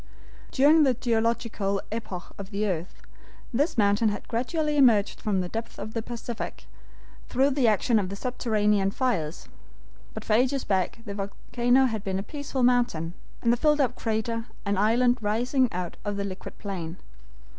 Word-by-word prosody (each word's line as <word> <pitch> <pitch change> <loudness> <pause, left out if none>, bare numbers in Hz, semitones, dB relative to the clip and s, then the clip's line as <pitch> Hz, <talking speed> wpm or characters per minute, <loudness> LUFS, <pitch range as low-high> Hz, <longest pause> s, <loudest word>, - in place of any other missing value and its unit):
During 295 +4 +5
the 265 -4 +4
geological 225 -4 0
epochs 195 -5 -5
of 195 -1 -7
the 210 0 -1
earth, 180 -3 -4 0.5
this 285 +4 +1
mountain 205 +1 +3
had 205 - -5
gradually 300 +6 -1
emerged 230 -8 +4
from 200 -3 +1
the 180 - -3
depths 225 +5 -5
of 215 +2 -6
the 230 - -1
Pacific, 235 0 -6 0.6
through 270 +3 +3
the 265 -3 +2
action 220 +2 +3
of 190 -3 -2
the 200 - -5
subterranean 210 -4 +1
fires, 195 - -2 0.7
but - - -6
for 215 - +1
ages 255 +4 +2
back 190 +3 0
the 200 - -5
volcano 240 +6 +1
had 220 -5 -2
been 190 -1 -2
a 195 - -2
peaceful 285 -1 -3
mountain, 240 -10 +2 0.3
and 235 - +4
the - - 0
filled 300 +3 +3
up 265 -3 +2
crater, 230 0 -2 0.2
an 200 0 +1
island 240 +5 +3
rising 245 +5 +1
out 180 -1 -4
of 205 -1 -2
the 200 - -1
liquid 190 -1 -7
plain. 180 -4 -5
225 Hz, 165 wpm, -26 LUFS, 200-250 Hz, 0.7 s, During